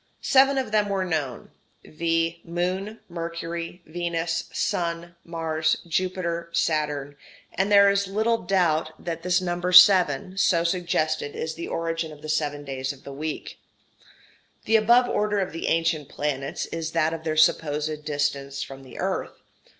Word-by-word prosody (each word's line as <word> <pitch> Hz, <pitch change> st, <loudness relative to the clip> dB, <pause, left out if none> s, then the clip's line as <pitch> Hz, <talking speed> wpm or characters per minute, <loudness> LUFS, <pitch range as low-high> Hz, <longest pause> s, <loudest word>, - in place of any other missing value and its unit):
Seven 270 Hz, +1 st, +5 dB
of 255 Hz, -5 st, -1 dB
them 210 Hz, -1 st, +2 dB
were 195 Hz, -1 st, 0 dB
known, 150 Hz, -8 st, -3 dB, 0.3 s
viz. 165 Hz, +1 st, -1 dB
Moon, 185 Hz, +5 st, -3 dB
Mercury, 170 Hz, 0 st, -5 dB
Venus, 165 Hz, 0 st, -2 dB
Sun, 170 Hz, 0 st, -2 dB
Mars, 160 Hz, -1 st, 0 dB
Jupiter, 170 Hz, -1 st, -2 dB
Saturn, 150 Hz, -4 st, -1 dB, 0.4 s
and 195 Hz, +2 st, 0 dB
there 200 Hz, 0 st, +7 dB
is 200 Hz, 0 st, +2 dB
little 220 Hz, +4 st, +1 dB
doubt 165 Hz, -4 st, +1 dB
that 170 Hz, -1 st, -3 dB
this 180 Hz, +1 st, +2 dB
number 175 Hz, 0 st, -2 dB
seven, 185 Hz, -1 st, +6 dB
so 170 Hz, -3 st, +3 dB
suggested, 170 Hz, -4 st, -1 dB
is 160 Hz, -, -3 dB
the 170 Hz, -, -6 dB
origin 165 Hz, -1 st, -2 dB
of 150 Hz, 0 st, -13 dB
the 155 Hz, -, -6 dB
seven 145 Hz, -1 st, -1 dB
days 135 Hz, -1 st, -3 dB
of 140 Hz, -2 st, -13 dB
the 140 Hz, -, -8 dB
week. 155 Hz, +2 st, -5 dB, 1.1 s
The 225 Hz, -, +3 dB
above 235 Hz, +3 st, +5 dB
order 210 Hz, 0 st, 0 dB
of 195 Hz, -2 st, -1 dB
the 165 Hz, -, -4 dB
ancient 165 Hz, -3 st, 0 dB
planets 140 Hz, -2 st, -3 dB
is 165 Hz, -1 st, -5 dB
that 165 Hz, -1 st, +2 dB
of 165 Hz, -1 st, -6 dB
their 155 Hz, -1 st, -2 dB
supposed 155 Hz, -1 st, +2 dB
distance 145 Hz, -2 st, -2 dB
from 135 Hz, 0 st, -10 dB
the 130 Hz, -2 st, -13 dB
earth. -, -, -3 dB
165 Hz, 150 wpm, -25 LUFS, 155-185 Hz, 1.1 s, there